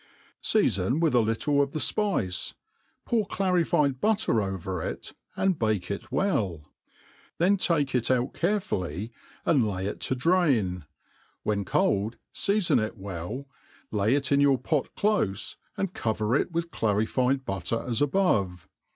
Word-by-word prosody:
Seafon 100 - +2
with 165 -4 +2
a 120 - +5
little 115 +6 +2
of 140 -1 -1
the - - -2
fpice, 145 - -1 0.5
pour 220 -4 +1
clarified 165 -9 +1
butter 215 - +2
over 95 -2 -3
it, - - -5 0.2
and 190 -4 +1
bake 110 -5 0
it 120 +5 -5
well* 100 - 0 0.7
Then 185 +4 +4
take 155 -8 +1
it 125 -2 +1
out 125 0 +1
carefully, 115 - -1 0.3
and 135 -9 +3
lay 95 -1 -3
it 100 - -3
to 130 - -1
drain; 125 - +2 0.6
^i^hen 100 -2 0
cold^ 100 +5 +1 0.2
feafoh 200 - +2
it 110 - -5
well, 100 +7 -5 0.5
lay 105 +4 +2
it 140 -1 -1
in 140 - +4
your 140 -2 +5
pot 140 +3 -1
dofe, 200 - 0 0.2
and 195 -2 -2
cover 110 +1 0
it 145 - +1
with 170 0 -2
clarified 125 +5 +1
butter, 95 +4 -2
as 120 0 -1
above. 110 - +1
125 Hz, 140 wpm, -27 LUFS, 100-165 Hz, 0.7 s, a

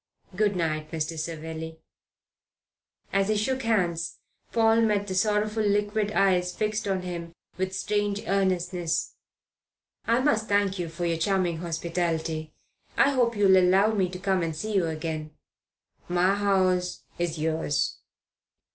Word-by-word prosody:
Good 205 0 +2
night, 155 -3 -1
Mr. 160 0 -3
Savelli." 160 0 -5 1.4
As 195 0 +2
he 215 - +2
shook 260 +5 0
hands 175 -8 0 0.3
Paul 225 0 +4
met 210 -3 +2
the 190 - -4
sorrowful 210 +2 +1
liquid 205 0 +1
eyes 180 -2 +2
fixed 215 0 -1
on 190 -2 -1
him 170 -2 -6 0.2
with 190 0 -2
strange 205 0 -1
earnestness. 180 -3 0 0.9
"I 235 +1 +3
must 225 -6 +1
thank 200 -2 +2
you 170 -2 -2
for 170 +2 -4
your 165 -1 0
charming 180 -2 +1
hospitality. 165 -1 -2 0.5
I 280 - +5
hope 245 -4 +2
you'll 195 -2 +5
allow 190 +4 +4
me 190 -4 +1
to 180 - -6
come 190 0 0
and 165 -2 -2
see 215 +7 -4
you 185 -4 +2
again." 155 -1 -4 0.7
"My 180 +2 +3
house 185 -3 +1 0.2
is 170 -1 -1
yours." 155 -2 -1
185 Hz, 140 wpm, -27 LUFS, 165-205 Hz, 1.4 s, I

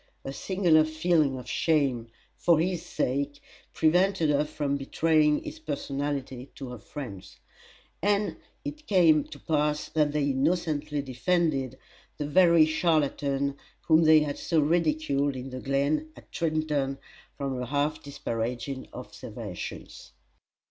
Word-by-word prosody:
A 135 - -4
singular 175 -1 +3
feeling 155 -3 +1
of 125 - -9
shame, 140 -8 +1 0.3
for 170 -2 +3
his 175 0 -1
sake, 140 +2 -2 0.3
prevented 175 0 +3
her 145 +1 +2
from 145 -2 -2
betraying 150 +2 +2
his 310 +1 -8
personality 140 - -4
to 135 -3 -7
her 125 -2 -8
friends; 100 -7 -9 0.6
and 205 +2 +1 0.3
it 300 +1 -7
came 165 -6 +5
to 145 - -11
pass 150 0 0
that 150 -2 +1
they 150 -1 0
innocently 150 0 0
defended 135 -1 0 0.4
the 145 - -2
very 170 +1 +5
charlatan 140 -4 0 0.2
whom 160 0 +4
they 155 0 +7
had 145 -1 -3
so 165 -2 +1
ridiculed 150 -3 +1
in 130 +1 -6
the 130 - -5
glen 140 +3 0
at - - -16
Trenton 155 -4 -1 0.4
from 135 -2 -3
her 125 - -3
half 145 +4 -1
disparaging 125 0 -4
observations. - - -8
150 Hz, 130 wpm, -27 LUFS, 140-160 Hz, 0.6 s, they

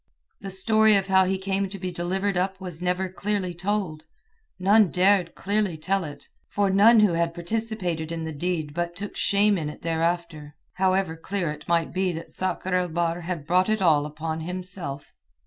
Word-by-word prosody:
The 195 - -7
story 215 +3 +4
of 195 -1 +2
how 190 -1 +4
he 190 +1 0
came 195 0 -1
to 200 - -7
be 185 -1 -4
delivered 190 +3 -1
up 190 +1 -1
was 180 -3 -6
never 180 +1 0
clearly 190 -1 -2
told; 175 -4 -2 0.5
none 200 +1 +5
dared 185 -1 +2
clearly 200 -4 -1
tell 190 +5 0
it, 145 - -9 0.2
for 200 -1 +1
none 215 +4 +6
who 205 -5 +4
had 165 0 0
participated 180 -4 -3
in 165 -1 -3
the 160 - -4
deed 155 -1 -2
but 175 +1 -3
took 200 +2 -6
shame 200 -1 +2
in 150 -2 -3
it 150 - -11
thereafter, 165 -2 -2 0.2
however 185 -2 +1
clear 175 0 -3
it 150 0 -10
might 170 -1 +1
be 185 0 +1
that 165 0 -8
Sakr 185 0 -1
el 180 0 +2
Bahr 170 +1 -1
had 170 -3 -4
brought 180 +5 +2
it 215 0 +1
all 155 -5 +3
upon 160 +1 -4
himself. 180 -4 -5
180 Hz, 185 wpm, -25 LUFS, 165-195 Hz, 0.5 s, none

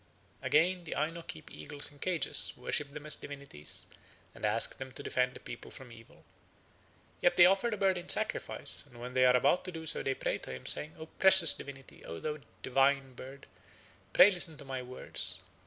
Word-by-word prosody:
Again, 175 +3 +1
the 155 - -6
Aino 165 +3 -3
keep 165 -2 -10
eagles 145 0 -6
in 145 - -19
cages, 180 -1 +1
worship 145 -2 -2
them 150 +1 -10
as 150 - +2
divinities, 140 - -8 0.5
and - - -16
ask - - 0
them 130 0 -8
to - - -9
defend 125 0 -1
the - - -9
people - - -10
from 130 -2 -13
evil. 115 -1 -17 1.0
Yet 175 0 +2
they 175 - +8
offer 195 +5 +2
the 215 - -4
bird 190 -2 +1
in 175 - -12
sacrifice, - - 0
and 120 - -16
when 125 +1 -8
they 130 0 +3
are 125 - +4
about 140 +8 +1
to 185 - -4
do 160 -2 -9
so - - 0
they 135 - -2
pray - - -3
to - - -9
him, 65 - -9
saying: 155 +1 0
"O 160 - -9
precious 190 -1 +8
divinity, 135 -1 -12
O 80 - -8
thou 150 0 -5 0.2
divine 135 0 +1
bird, 135 +2 -12 0.7
pray 205 - +7
listen 175 -4 -2
to 140 - -12
my 135 -1 -5
words. 125 +1 +3
145 Hz, 200 wpm, -30 LUFS, 130-170 Hz, 1.0 s, they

